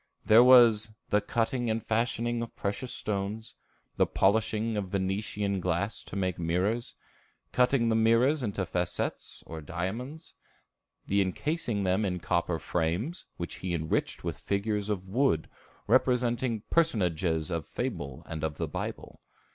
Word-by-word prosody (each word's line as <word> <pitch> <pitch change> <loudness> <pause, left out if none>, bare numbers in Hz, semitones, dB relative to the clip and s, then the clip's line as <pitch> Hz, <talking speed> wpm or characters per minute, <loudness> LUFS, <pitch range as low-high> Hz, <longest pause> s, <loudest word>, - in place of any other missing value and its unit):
There 110 +3 +8
was 115 -4 +6 0.2
"the 105 - +4
cutting 115 +3 -1
and 110 0 -1
fashioning 115 +1 0
of 115 - -6
precious 105 +6 -3
stones; 105 +2 -3 0.4
the - - +4
polishing 110 +2 +1
of 100 -3 -2
Venetian 100 +1 -1
glass 100 +4 -1
to - - -8
make 95 -3 -1
mirrors; 90 +8 -1 0.6
cutting 125 -2 +3
the 110 - +2
mirrors 115 +7 +4
into 100 -5 -2
facettes 90 0 -3
or 80 -1 -7
diamonds; 110 - -5 0.7
the 100 0 +2
encasing 115 - -1
them 95 +3 +1
in 90 -3 -1
copper 85 0 0
frames, 90 - -2
which 85 - -5
he 90 -2 -2
enriched 80 -1 -1
with - - -4
figures 105 +1 -1
of 95 -3 -2
wood 110 - +1 0.4
representing 120 -3 +2
personages 90 - +1
of 85 -3 -3
fable 70 -3 -4
and 80 -2 -6
of 75 -2 -2
the - - -2
Bible." - - -6
105 Hz, 140 wpm, -29 LUFS, 90-115 Hz, 0.7 s, There